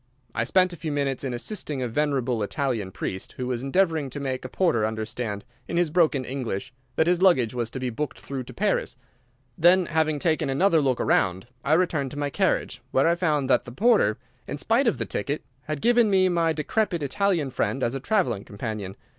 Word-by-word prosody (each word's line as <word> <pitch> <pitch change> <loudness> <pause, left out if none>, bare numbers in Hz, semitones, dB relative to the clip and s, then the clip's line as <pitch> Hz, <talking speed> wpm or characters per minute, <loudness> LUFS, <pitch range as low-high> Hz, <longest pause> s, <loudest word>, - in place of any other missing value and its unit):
I 115 - 0
spent 185 +5 +3
a - - -8
few 155 0 -4
minutes 140 -2 -1
in 135 - -2
assisting 140 - -3
a - - -1
venerable 130 -2 0
Italian 115 -2 -1
priest, 95 +1 -5
who 125 - -4
was 125 -1 -2
endeavouring 160 0 +1
to 135 - -6
make 130 -2 -3
a 130 - -6
porter 165 - +1
understand, 110 -1 -3 0.2
in 170 - -2
his 175 -3 +2
broken 155 -6 +2
English, 130 -2 -4 0.2
that 160 - +3
his 175 +1 +2
luggage 130 - +4
was 120 -2 -2
to 130 - -6
be 125 -1 -2
booked 150 +6 -4
through 135 -2 -5
to - - -10
Paris. 205 0 0 0.6
Then, 175 +2 +6
having 155 -2 +1
taken 155 -2 +1
another 165 +4 +3
look 130 -3 +1
round, 95 +2 +1 0.2
I 145 - +2
returned 160 -5 +1
to 145 - -9
my 145 -1 -1
carriage, - - 0
where 135 - +3
I 170 - +4
found 155 -6 0
that 125 -2 +3
the 120 - -8
porter, 200 - +3 0.3
in 145 - -4
spite 235 - +2
of 230 - +2
the - - -2
ticket, 145 +2 -3 0.2
had 150 -2 -4
given 240 -2 +4
me 190 -2 +4
my 170 -2 +2
decrepit 170 +2 -1
Italian 165 -1 0
friend 130 +1 -1
as 120 - 0
a 135 - -3
traveling 135 - 0
companion. 100 -2 -5
140 Hz, 205 wpm, -25 LUFS, 125-170 Hz, 0.6 s, Then